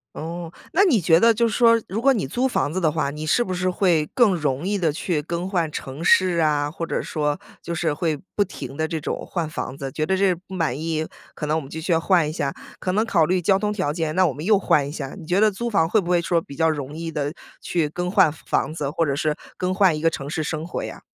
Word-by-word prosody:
哦， 165 Hz, +1 st, -6 dB, 0.2 s
那 390 Hz, +5 st, +5 dB
你 280 Hz, -, +4 dB
觉 165 Hz, 0 st, +4 dB
得 230 Hz, 0 st, +6 dB
就 235 Hz, +2 st, +2 dB
是 220 Hz, -, -2 dB
说， 230 Hz, -1 st, +5 dB
如 205 Hz, +5 st, -3 dB
果 275 Hz, +2 st, +5 dB
你 210 Hz, -, 0 dB
租 245 Hz, -, -1 dB
房 245 Hz, -, 0 dB
子 185 Hz, -, -1 dB
的 155 Hz, -, +3 dB
话， 150 Hz, -2 st, -1 dB
你 150 Hz, +1 st, -6 dB
是 155 Hz, -, +3 dB
不 185 Hz, -, -3 dB
是 180 Hz, +1 st, 0 dB
会 175 Hz, -4 st, +2 dB
更 235 Hz, -8 st, +4 dB
容 145 Hz, 0 st, -1 dB
易 205 Hz, 0 st, 0 dB
地 165 Hz, -4 st, +1 dB
去 155 Hz, 0 st, -1 dB
更 170 Hz, +4 st, -4 dB
换 170 Hz, -5 st, 0 dB
城 135 Hz, +4 st, -6 dB
市 180 Hz, -1 st, +4 dB
啊， 145 Hz, -2 st, +2 dB
或 165 Hz, +2 st, -5 dB
者 -, -, -2 dB
说， 150 Hz, -2 st, -2 dB, 0.2 s
就 170 Hz, -, -4 dB
是 165 Hz, -2 st, 0 dB
会 155 Hz, -2 st, -1 dB, 0.2 s
不 205 Hz, -, +3 dB
停 180 Hz, -7 st, -8 dB
地 160 Hz, +2 st, 0 dB
这 160 Hz, -, -2 dB
种 -, -, -4 dB
换 165 Hz, -4 st, -3 dB
房 135 Hz, -3 st, -5 dB
子。 135 Hz, -, -4 dB
觉 155 Hz, -, -1 dB
得 190 Hz, +3 st, +1 dB
这 195 Hz, +1 st, +3 dB
儿 -, -, -6 dB
不 185 Hz, +2 st, -14 dB
满 160 Hz, -8 st, -1 dB
意， 160 Hz, 0 st, -2 dB, 0.3 s
可 -, -, -5 dB
能 155 Hz, +1 st, +1 dB
我 160 Hz, -, 0 dB
们 135 Hz, -, -11 dB
就 160 Hz, -, -6 dB
需 170 Hz, +2 st, 0 dB
要 165 Hz, -, +3 dB
换 170 Hz, -3 st, +3 dB
一 155 Hz, -, -5 dB
下， 140 Hz, -3 st, -2 dB, 0.3 s
可 185 Hz, -, -1 dB
能 215 Hz, +4 st, +1 dB
考 175 Hz, -7 st, +3 dB
虑 180 Hz, +3 st, +1 dB
交 190 Hz, +3 st, +3 dB
通 210 Hz, +1 st, -1 dB
条 185 Hz, -8 st, -1 dB
件， 160 Hz, -2 st, -2 dB
那 185 Hz, +1 st, +4 dB
我 140 Hz, -, -1 dB
们 150 Hz, +4 st, -7 dB
又 205 Hz, 0 st, +4 dB
换 150 Hz, -6 st, +2 dB
一 -, -, -6 dB
下。 140 Hz, 0 st, -6 dB
你 170 Hz, -, -10 dB
觉 180 Hz, +4 st, +1 dB
得 215 Hz, 0 st, +5 dB
租 235 Hz, +4 st, -4 dB
房 165 Hz, -7 st, +2 dB
会 215 Hz, +4 st, +3 dB
不 175 Hz, -, -6 dB
会 175 Hz, -1 st, +3 dB
说 170 Hz, 0 st, +1 dB
比 140 Hz, -3 st, -11 dB
较 160 Hz, 0 st, +3 dB
容 145 Hz, -2 st, -3 dB
易 165 Hz, +1 st, -5 dB
地 145 Hz, -1 st, -2 dB, 0.3 s
去 165 Hz, -4 st, 0 dB
更 180 Hz, +4 st, -3 dB
换 190 Hz, -5 st, +5 dB
房 155 Hz, -, -2 dB
子， 150 Hz, -4 st, -3 dB
或 165 Hz, +3 st, 0 dB
者 140 Hz, -, 0 dB
是 150 Hz, +1 st, 0 dB, 0.2 s
更 185 Hz, 0 st, -1 dB
换 185 Hz, -5 st, +3 dB
一 -, -, -6 dB
个 165 Hz, -, +4 dB
城 140 Hz, -3 st, -6 dB
市 155 Hz, 0 st, -2 dB
生 155 Hz, +2 st, -3 dB
活 -, -, -4 dB
呀？ -, -, -7 dB
165 Hz, 305 characters per minute, -23 LUFS, 155-185 Hz, 0.3 s, 得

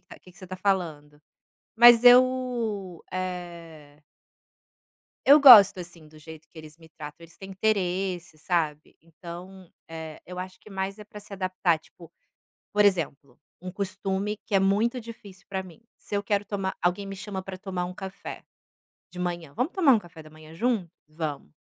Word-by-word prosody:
ca -, -, -13 dB
que 180 Hz, -, -18 dB
que -, -, -19 dB
você 185 Hz, -, -11 dB
tá 185 Hz, +1 st, -7 dB
falando?". 155 Hz, -7 st, -2 dB, 0.5 s
Mas 240 Hz, +1 st, +8 dB
eu, 245 Hz, -7 st, +3 dB
eh 170 Hz, -5 st, -7 dB, 1.3 s
eu 285 Hz, +2 st, +9 dB
gosto, 210 Hz, -9 st, +9 dB
assim, 170 Hz, -3 st, -12 dB
do 155 Hz, -, -17 dB
jeito 160 Hz, +1 st, -13 dB
que 165 Hz, -, -15 dB
eles 155 Hz, +1 st, -13 dB
me 160 Hz, -1 st, -17 dB
tratam. 150 Hz, -2 st, -10 dB
Eles 165 Hz, 0 st, -15 dB
têm 195 Hz, 0 st, -10 dB
interesse, 185 Hz, -4 st, -2 dB
sabe. 155 Hz, -3 st, -2 dB
Então, 175 Hz, +2 st, -11 dB, 0.2 s
eh, 160 Hz, -1 st, -8 dB
eu 180 Hz, 0 st, -8 dB
acho 185 Hz, 0 st, -7 dB
que 210 Hz, -, -17 dB
mais 195 Hz, +1 st, -4 dB
é 210 Hz, -, -10 dB
para 210 Hz, 0 st, -12 dB
se 205 Hz, -, -15 dB
adaptar 185 Hz, -3 st, 0 dB
tipo, 170 Hz, +1 st, -17 dB, 0.6 s
por 210 Hz, 0 st, +3 dB
exemplo, 165 Hz, -8 st, 0 dB, 0.2 s
um 185 Hz, 0 st, -7 dB
costume 195 Hz, +2 st, -3 dB
que 210 Hz, -, -4 dB
é 195 Hz, -, +6 dB
muito 215 Hz, +6 st, +1 dB
difícil 220 Hz, -5 st, -13 dB
pra 190 Hz, -1 st, -3 dB
mim, 180 Hz, +2 st, -15 dB, 0.2 s
se -, -, -9 dB
eu 200 Hz, -, -1 dB
quero 205 Hz, 0 st, 0 dB
tomar 195 Hz, -2 st, -4 dB
alguém 180 Hz, +3 st, 0 dB
me 195 Hz, 0 st, -7 dB
chama 195 Hz, -1 st, -6 dB
para 190 Hz, 0 st, -8 dB
tomar 185 Hz, -2 st, -4 dB
um 180 Hz, +1 st, -7 dB
café, 190 Hz, 0 st, -8 dB, 0.7 s
de -, -, -13 dB
manhã: 175 Hz, -4 st, -4 dB
"Vamos 255 Hz, -, -2 dB
tomar 325 Hz, -9 st, +5 dB
um 225 Hz, -, +3 dB
café 170 Hz, -4 st, -14 dB
da 155 Hz, -, -14 dB
manhã 155 Hz, 0 st, -15 dB
junto?". 215 Hz, -2 st, -1 dB, 0.2 s
"Vamos". 155 Hz, -, -6 dB
185 Hz, 175 wpm, -26 LUFS, 165-205 Hz, 1.3 s, eu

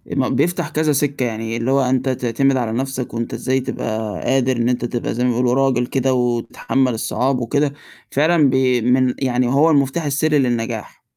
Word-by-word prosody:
ما 130 Hz, -2 st, +1 dB
بيفتح 175 Hz, -1 st, 0 dB
كذا 155 Hz, 0 st, 0 dB
سِكّة، 140 Hz, -2 st, 0 dB
يعني 115 Hz, 0 st, -3 dB
اللي 120 Hz, +3 st, -1 dB
هو 135 Hz, 0 st, +3 dB
أنت 130 Hz, +1 st, 0 dB
تعتمد 130 Hz, +2 st, +1 dB
على 115 Hz, -3 st, -1 dB
نَفْسك 130 Hz, +1 st, -3 dB
وأنت 115 Hz, 0 st, -4 dB
إزاي 130 Hz, +1 st, 0 dB
تبقى 110 Hz, -4 st, -4 dB
قادر 130 Hz, -1 st, +1 dB
إن 120 Hz, +1 st, +1 dB
أنت 120 Hz, -1 st, -1 dB
تبقى 120 Hz, 0 st, -3 dB
زي 120 Hz, +2 st, -2 dB
ما 125 Hz, -, +2 dB
بيقولوا 125 Hz, +1 st, +1 dB
راجل 130 Hz, -2 st, +2 dB
كده 130 Hz, +1 st, 0 dB
وتتحمل 125 Hz, +1 st, 0 dB
الصعاب 125 Hz, +3 st, -1 dB
وكده، 140 Hz, +4 st, 0 dB, 0.4 s
فعلًا 155 Hz, 0 st, +3 dB
بي 130 Hz, -2 st, +2 dB
من 125 Hz, +1 st, +2 dB
يعني 125 Hz, -2 st, 0 dB
هو 140 Hz, +6 st, +3 dB
المفتاح 140 Hz, +3 st, +1 dB
السرّي 150 Hz, +1 st, +1 dB
للنجاح. 120 Hz, -3 st, -2 dB
130 Hz, 185 wpm, -19 LUFS, 120-135 Hz, 0.4 s, هو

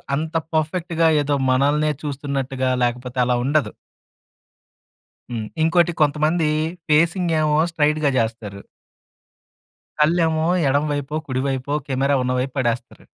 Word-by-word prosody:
అంత 160 Hz, +3 st, -4 dB, 0.2 s
పర్ఫెక్ట్‌గా 165 Hz, +1 st, 0 dB
ఏదో 145 Hz, 0 st, 0 dB, 0.2 s
మనల్నే 145 Hz, +4 st, +2 dB
చూస్తున్నట్టుగా 135 Hz, -2 st, -2 dB
లేకపోతే 125 Hz, +1 st, -2 dB
అలా 125 Hz, 0 st, +1 dB
ఉండదు. 145 Hz, +2 st, +1 dB, 1.6 s
హ్మ్. 110 Hz, -2 st, -4 dB, 0.2 s
ఇంకోటి 170 Hz, +1 st, +3 dB
కొంతమంది 155 Hz, +2 st, +2 dB, 0.4 s
ఫేసింగ్ 170 Hz, +3 st, +2 dB
ఏమో 150 Hz, -1 st, +2 dB, 0.2 s
స్ట్రైట్‌గా 150 Hz, -2 st, +1 dB
జేస్తారు. 110 Hz, -3 st, -3 dB, 1.4 s
కళ్ళేమో 160 Hz, 0 st, +2 dB, 0.2 s
ఎడమవైపో, 145 Hz, +1 st, -1 dB
కుడివైపో 135 Hz, +1 st, -2 dB
కెమెరా 140 Hz, +1 st, +1 dB
ఉన్నవైపు 125 Hz, +1 st, -1 dB
పడేస్తారు. 120 Hz, -2 st, -3 dB
145 Hz, 95 wpm, -21 LUFS, 130-155 Hz, 1.6 s, ఇంకోటి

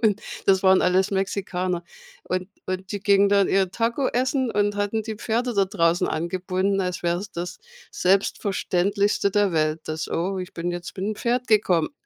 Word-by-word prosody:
und 215 Hz, -2 st, +2 dB, 0.3 s
das 190 Hz, -1 st, +4 dB
waren 190 Hz, 0 st, +5 dB
alles 185 Hz, +2 st, +2 dB
Mexikaner. 185 Hz, -2 st, -2 dB, 0.4 s
Und 185 Hz, +1 st, -2 dB, 0.2 s
und 185 Hz, 0 st, -4 dB
die 205 Hz, -, -3 dB
gingen 200 Hz, 0 st, +4 dB
dann 200 Hz, -1 st, +4 dB
ihr 190 Hz, -2 st, +2 dB
Taco 235 Hz, +5 st, 0 dB
essen 260 Hz, 0 st, 0 dB
und 205 Hz, -1 st, +1 dB
hatten 205 Hz, +2 st, -1 dB
die 220 Hz, 0 st, -5 dB
Pferde 235 Hz, +3 st, -1 dB
da 200 Hz, -1 st, +3 dB
draußen 175 Hz, -3 st, +1 dB
angebunden, 185 Hz, +4 st, -1 dB
als 180 Hz, -1 st, -3 dB
wäre 175 Hz, 0 st, +1 dB
es 200 Hz, +1 st, -7 dB
das 175 Hz, +1 st, -5 dB, 0.3 s
Selbstverständlichste 200 Hz, +1 st, +1 dB
der 205 Hz, -2 st, +2 dB
Welt, 155 Hz, 0 st, +1 dB
dass: 155 Hz, 0 st, -3 dB
„Oh, 190 Hz, +3 st, -1 dB
ich 180 Hz, -1 st, -7 dB
bin 175 Hz, +1 st, -2 dB
jetzt 175 Hz, 0 st, -6 dB
bin 195 Hz, +2 st, -3 dB
mit 215 Hz, -, -3 dB
dem -, -, -9 dB
Pferd 245 Hz, +1 st, 0 dB
gekommen.“ 185 Hz, -6 st, +3 dB
195 Hz, 185 wpm, -24 LUFS, 180-205 Hz, 0.4 s, waren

